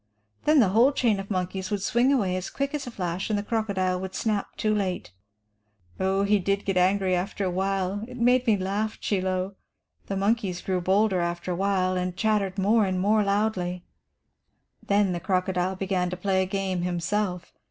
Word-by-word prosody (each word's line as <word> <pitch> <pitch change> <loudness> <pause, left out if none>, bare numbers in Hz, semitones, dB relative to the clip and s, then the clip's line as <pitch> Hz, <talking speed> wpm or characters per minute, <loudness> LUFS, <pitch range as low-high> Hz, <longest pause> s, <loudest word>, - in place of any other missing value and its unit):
Then 300 0 +5
the 215 -7 +5
whole 230 +8 +5
chain 230 -7 +1
of 195 - -7
monkeys 185 -1 -2
would 205 -2 -2
swing 240 +5 +3
away 200 -10 +1
as 185 0 -4
quick 275 +1 -3
as 290 -3 -3
a - - -3
flash, 180 -4 -3
and 210 - +1
the 205 - -2
crocodile 200 -5 -1
would 190 0 -6
snap 210 -3 -2
too 215 0 +1
late. 190 - -2 0.9
"Oh, 190 +1 +1
he 205 +1 +3
did 200 +2 -1
get 195 - 0
so - - +4
angry 190 0 +2
after 195 +2 -2
awhile, 190 +2 -1
it 250 0 -9
made 250 +1 +3
me 215 -2 +4
laugh, 200 +3 -2
Chie 200 -3 0
Lo. 185 +1 -1 0.5
The 195 - -2
monkeys 200 -3 0
grew 185 -1 -1
bolder 195 +1 +2
after 175 +1 -2
awhile, 185 0 +1
and 180 0 -3
chattered 210 -3 0
more 210 +3 +3
and 185 -1 -1
more 210 +3 +3
loudly. 200 -3 -1 1.0
"Then 200 -1 +2
the 175 - -2
crocodile 185 0 0
began 185 -1 -1
to 180 - -5
play 190 0 +1
a 190 - -1
game 190 -2 -2
himself. 180 +1 -2
195 Hz, 190 wpm, -26 LUFS, 185-210 Hz, 1.0 s, Then